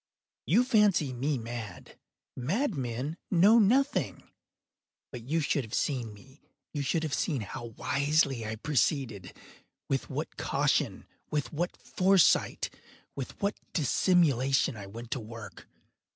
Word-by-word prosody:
You 220 +10 +5
fancy 205 - +3
me 135 +4 -1
mad. 115 -5 -7 0.4
Madmen 140 - -2
know 200 +6 +6
nothing. 260 +7 +2 0.9
But 125 - -7
you 165 +2 +2
should 145 -1 0
have 110 +1 -5
seen 125 -6 -1
me. 130 +8 -17 0.3
You 145 - -2
should 155 +4 0
have 155 -4 -2
seen 145 -9 0
how 120 +4 -6
wisely 140 +2 +1
I 110 0 -3
proceeded—with 120 - -3
what - - -4
caution—with 150 0 -1
what 175 +4 -2
foresight—with 185 -7 0
what 200 +1 0
dissimulation 140 -5 +2
I 100 -2 -8
went 115 +4 -9
to - - -1
work! 115 0 -10
140 Hz, 115 wpm, -29 LUFS, 120-165 Hz, 0.9 s, know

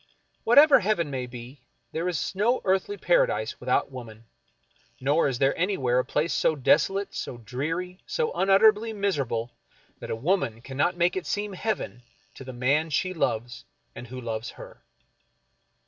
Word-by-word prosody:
Whatever 285 +5 +7
heaven 185 -8 0
may 130 -2 -3
be, 120 +2 -10 0.3
there 170 +3 -2
is 175 +1 -2
no 230 +6 +2
earthly 195 - +1
paradise - - +1
without - - 0
woman, 115 -3 -10 0.7
nor 145 +5 +2
is 135 -3 -2
there 135 +2 +2
anywhere 135 -10 +1
a - - +1
place 155 +3 -1
so 160 - +2
desolate, 180 +8 +2
so 120 - -5
dreary, 165 - -4
so 470 -1 -1
unutterably 210 +3 +4
m.iserable 140 - -2 0.5
that - - -8
a - - -1
woman 135 - 0
cannot 145 +8 -1
make 175 +1 +2
it 185 - -4
seem 205 -1 -2
heaven 195 - -3 0.3
to - - -10
the 130 - -8
man 140 +6 +1
she 185 +5 0
loves 120 -7 -2 0.3
and 125 - -9
who 130 +2 -7
loves 115 -2 -4
her. - - -12
160 Hz, 155 wpm, -26 LUFS, 125-195 Hz, 0.7 s, Whatever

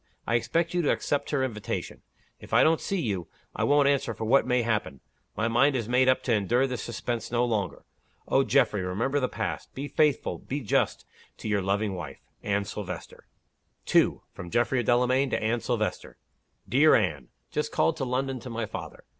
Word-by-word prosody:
I - - -1
expect 165 +9 +1
you 175 - +2
to 150 - +1
accept 145 -1 0
her 140 -3 +1
invitation. 110 -6 -4 0.4
If - - -4
I - - +7
don't 160 0 +3
see 195 - -1
you, 100 - -2 0.3
I - - -1
won't 145 0 +4
answer 140 -5 +1
for 110 - -4
what 130 +4 +4
may 125 -1 +2
happen. 105 - -1 0.4
My 105 +3 +1
mind 130 +5 +3
is 115 -4 -2
made 125 +2 +3
up 130 0 +2
to 125 - +1
endure 115 +5 +2
this 125 -2 -3
suspense 120 0 -4
no 120 0 +2
longer. 105 -6 -2 0.4
Oh, 135 - +3
Geoffrey, 120 -8 +2
remember 115 +10 -1
the 125 - 0
past! - - -4
Be 140 +2 -4
faithful 150 -1 +1
be 145 +2 -4
just 105 - 0 0.3
to - - -7
your 105 -2 +1
loving 100 +2 0
wife, 80 -7 -7 0.2
"ANNE 100 0 0
SILVESTER." 90 -4 -7 0.6
2. - - +3
From 85 - -8
Geoffrey 120 +4 +1
Delamayn 125 +3 +2
to - - 0
Anne 110 +2 0
Silvester. - - -2 0.5
"DEAR - - +5
ANNE, - - 0 0.2
Just 150 - -2
called 165 - +2
to 140 - -2
London 130 +1 -1
to 125 - -9
my 115 -1 -3
father. - - -8
120 Hz, 190 wpm, -27 LUFS, 105-135 Hz, 0.6 s, I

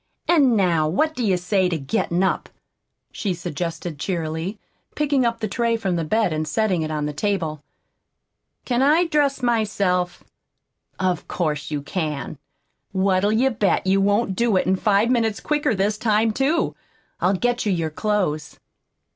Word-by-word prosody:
"An' 285 -8 +4
now 170 -6 +2
what 310 - +1
do 250 - -3
you 195 -4 +2
say 185 +1 +1
to 170 - -1
gettin' 165 +5 -1
up?" 190 - 0 0.6
she 195 -4 -2
suggested 170 -2 -5
cheerily, 170 +3 -3 0.4
picking 285 -4 +2
up 230 0 -2
the 215 - 0
tray 230 +3 0
from 195 -5 -1
the 165 - -1
bed 210 +2 +1
and 155 0 -2
setting 185 +1 +1
it 155 - -2
on 150 -1 -2
the 150 - -3
table. 160 -4 -2 1.0
"Can 245 0 +1
I 310 +6 +4
dress 285 -4 +1
myself?" 200 -6 0 0.8
"Of 185 -3 -1
course 150 -4 -2
you 145 -2 -3
can! 150 -3 -4 0.5
What'll 190 +1 +2
you 250 +5 +3
bet 200 -6 +1
you 195 +1 +3
won't 205 0 +1
do 230 -2 +2
it 185 0 +1
five 210 +3 +3
minutes 225 -4 +1
quicker 295 -6 0
this 205 +2 0
time, 220 -1 +2
too? 275 +9 0 0.4
I'll 190 +2 +2
get 245 +3 0
your 165 -5 0
clothes." 165 -6 -1
195 Hz, 155 wpm, -22 LUFS, 170-230 Hz, 1.0 s, An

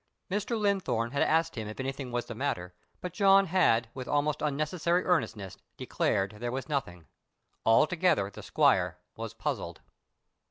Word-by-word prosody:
Mr. 210 +3 -1
Linthorne 190 - 0
had 140 - -1
asked 165 +1 +2
him 110 -3 -5
if 110 - -8
anything 135 -1 -4
was 120 0 -2
the - - -7
matter, 110 -9 -3 0.3
but 180 -2 -5
John 195 0 +5
had 160 -10 +3
with 130 -1 -7
almost 145 +1 0
unnecessary 155 +4 0
earnestness 110 - -1 0.2
declared 100 +2 -1
there 120 +1 -3
was 130 +1 -4
nothing. 90 - -3 0.6
Altogether 150 - +3
the - - -10
squire - - +2 0.2
was - - -6
puzzled. - - -4
140 Hz, 150 wpm, -29 LUFS, 115-175 Hz, 0.6 s, John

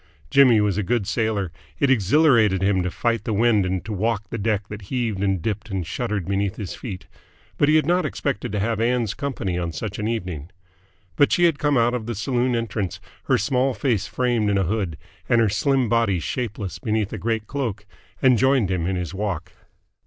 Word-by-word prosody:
Jimmy 130 -5 +6
was 105 -1 +1
a 95 - -4
good 120 -5 +1
sailor: 105 -4 -1 0.3
it 140 -2 +3
exhilarated 110 - +4
him 95 -1 +2
to 90 - -1
fight 115 +3 -1
the 110 - -1
wind 110 -3 +3
and 90 -1 -2
to 110 - -4
walk 110 +2 0
a 115 - -2
deck 105 -1 0
that 105 0 -7
heaved 115 -6 -1
and 95 -2 +1
dipped 105 0 -3
and 95 -3 -2
shuddered 100 0 -3
beneath 100 0 0
his 100 -5 -5
feet; 95 -7 -7 0.5
but 145 - +4
he 155 - +5
had 155 - +4
not 180 +3 +2
expected 135 -9 -3
to 105 - 0
have 110 +2 0
Ann's 120 -2 +1
company 120 - -3
on 85 -1 -2
such 100 +5 -5
an 105 - -1
evening. 90 -9 -4 0.7
But 145 - +4
she 175 - +3
had 165 -4 +3
come 145 -2 +2
out 120 +1 +3
of 120 -3 -3
the 120 - -3
saloon 125 +3 0
entrance, 105 -6 -3 0.3
her - - +3
small 125 +5 +1
face 110 -2 0
framed 120 -4 0
in 100 - +2
a 95 - +2
hood 95 -4 -2 0.3
and 120 -2 +4
her 110 -2 +3
slim 130 +4 +1
body 115 -5 +2
shapeless 105 - -4
beneath 110 -4 -1
a - - -4
great 110 -2 -1
cloak, 110 -6 -3 0.4
and 125 -4 +5
joined 130 -7 +3
him 90 -2 -1
in 95 - 0
his 90 -2 -4
walk. 95 -3 -3
110 Hz, 210 wpm, -23 LUFS, 95-120 Hz, 0.7 s, Jimmy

